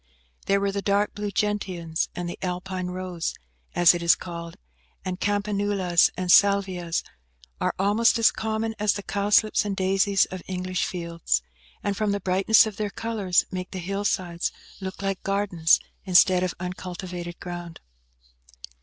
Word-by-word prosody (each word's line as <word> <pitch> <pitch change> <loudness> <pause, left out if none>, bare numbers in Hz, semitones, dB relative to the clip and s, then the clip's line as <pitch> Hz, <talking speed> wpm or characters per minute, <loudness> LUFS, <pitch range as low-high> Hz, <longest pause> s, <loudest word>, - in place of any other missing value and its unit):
There 200 0 +3
were 200 0 0
the 200 0 -3
dark 200 +1 +1
blue 205 0 -3
gentians 185 -5 -1
and 175 -1 -4
the 175 - -6
Alpine 185 0 -3
rose, 180 -2 -4
† - - -15 0.4
as 175 0 +7
it 175 - -3
is 170 -1 +5
called, 170 -1 -8 0.5
and 185 0 -3
campanulas 205 -3 +2
and 180 -1 0
salvias, 190 -4 +3 0.6
are - - 0
almost 210 +5 +3
as 230 - +5
common 220 0 -2
as 210 -1 +3
the 200 - -5
cowslips 205 +2 +2
and 205 -1 -2
daisies 195 +1 +3
of 185 -1 -6
English 185 -1 -2
fields, 170 - -2 0.4
and, 200 - -1
from 210 -1 0
the 200 - -1
brightness 195 +4 +4
of 215 -2 -6
their 210 -1 -2
colours, 200 -5 0
make 185 -1 -4
the - - -7
hillsides 185 -2 -2 0.3
look 190 0 -6
like 195 -1 -2
gardens, 195 -5 +2 0.2
instead 185 -1 +5
of 185 -1 -1
uncultivated 180 -1 -6
ground. 175 -1 -7
190 Hz, 155 wpm, -25 LUFS, 180-200 Hz, 0.6 s, as